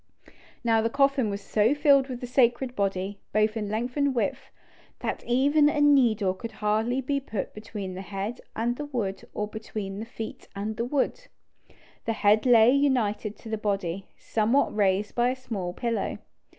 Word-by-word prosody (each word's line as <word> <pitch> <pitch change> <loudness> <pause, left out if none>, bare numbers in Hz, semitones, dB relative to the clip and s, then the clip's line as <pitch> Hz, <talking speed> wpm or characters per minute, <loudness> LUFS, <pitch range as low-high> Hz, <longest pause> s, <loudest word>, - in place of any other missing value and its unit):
Now 225 -1 +3
the 225 - +1
coffin 275 -2 +2
was 200 0 -4
so 215 +6 +2
filled 280 -2 +4
with 250 -1 -5
the - - -3
sacred 245 0 +2
body, 195 0 -2
both 215 +1 +2
in 210 -2 -3
length 235 +4 -2
and 285 -2 +1
width, 235 - -2 0.5
that - - -3
even 285 +5 +4
a 295 - -1
needle 240 -10 +4
could 225 +4 -8
hardly 220 +5 0
be 280 +2 -1
put 225 -7 -5
between 210 -3 -6
the 185 - -6
head 195 +4 -5
and 240 +2 -1
the 295 - -4
wood 220 -9 -3
or 210 - -1
between 210 -2 -6
the 225 - -6
feet 225 -1 -7
and 210 +2 -3
the 230 - -2
wood. 295 - -1 0.8
The 225 - 0
head 215 +2 +3
lay 235 -1 +7
united 240 -7 +1
to 225 - -11
the 220 -1 -2
body, 195 -3 -2
somewhat 230 +5 +1
raised 200 0 +1
by 240 +1 +2
a 255 - -1
small 215 -9 -4
pillow. 230 +5 -2
225 Hz, 175 wpm, -27 LUFS, 205-255 Hz, 0.8 s, lay